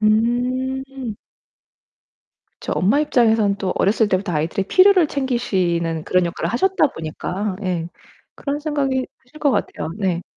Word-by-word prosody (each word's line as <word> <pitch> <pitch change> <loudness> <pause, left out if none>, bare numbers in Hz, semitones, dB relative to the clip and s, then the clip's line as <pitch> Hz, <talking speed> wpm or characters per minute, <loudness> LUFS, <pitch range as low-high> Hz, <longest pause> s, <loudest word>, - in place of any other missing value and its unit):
음. 250 +3 0 1.5
저 - - -3
엄마 210 +11 +2
입장에서는 225 -8 +3
또 190 -2 -2
어렸을 215 +2 +2
때부터 185 -1 0
아이들의 165 +5 -1
필요를 375 -3 +6
챙기시는 180 - -1
그런 180 -1 +2
역할을 170 - -3
하셨다 335 +3 +2
보니까 185 +4 -4
예 175 -3 -2 0.5
그런 285 +1 -3
생각이 275 -4 -1 0.2
드실 275 +5 -16
것 285 - +3
같아요. 205 -7 -2
네. 180 -3 0
220 Hz, 295 characters per minute, -21 LUFS, 185-265 Hz, 1.5 s, 필요를